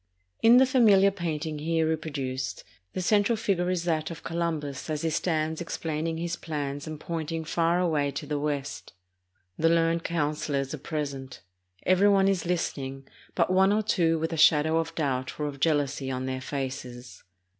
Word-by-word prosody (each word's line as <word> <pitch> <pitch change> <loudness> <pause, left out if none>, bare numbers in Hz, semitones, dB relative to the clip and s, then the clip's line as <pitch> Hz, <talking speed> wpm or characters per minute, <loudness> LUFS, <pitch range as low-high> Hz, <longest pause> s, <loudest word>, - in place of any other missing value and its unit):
In 235 +2 +7
the 260 - +7
familiar 215 -7 +5
painting 160 -4 -3
here 160 +1 +1
reproduced, 140 -5 -3 0.3
the 185 - -2
central 210 +4 +3
figure 190 -5 0
is 180 -2 0
that 160 -2 0
of 165 - -8
Columbus 160 -4 -3
as 155 0 -2
he 165 - 0
stands 160 0 -1
explaining 160 -1 -3
his 170 0 -2
plans 145 -3 -4
and 155 -1 -6
pointing 160 0 -4
far 170 +2 +1
away 155 -5 +1
to 140 +2 -5
the 145 0 -2
west. 145 -1 -4 0.7
The 165 - +4
learned 165 0 +2
councilors 145 -4 -1
are 155 - -5
present. 140 -3 -5 0.4
Every 185 +2 +4
one 195 -1 +4
is 190 -3 0
listening, 135 -6 -3 0.3
but 185 - +2
one 190 +1 +5
or 215 +1 +2
two 165 -5 +2
with 160 +1 -2
a - - -3
shadow 155 +1 +5
of 165 - -4
doubt 130 -4 -2
or 150 - -1
of 140 -2 -5
jealousy 145 -3 +1
on 130 0 -3
their 130 0 -3
faces. 130 -3 -6
160 Hz, 170 wpm, -27 LUFS, 145-170 Hz, 0.7 s, In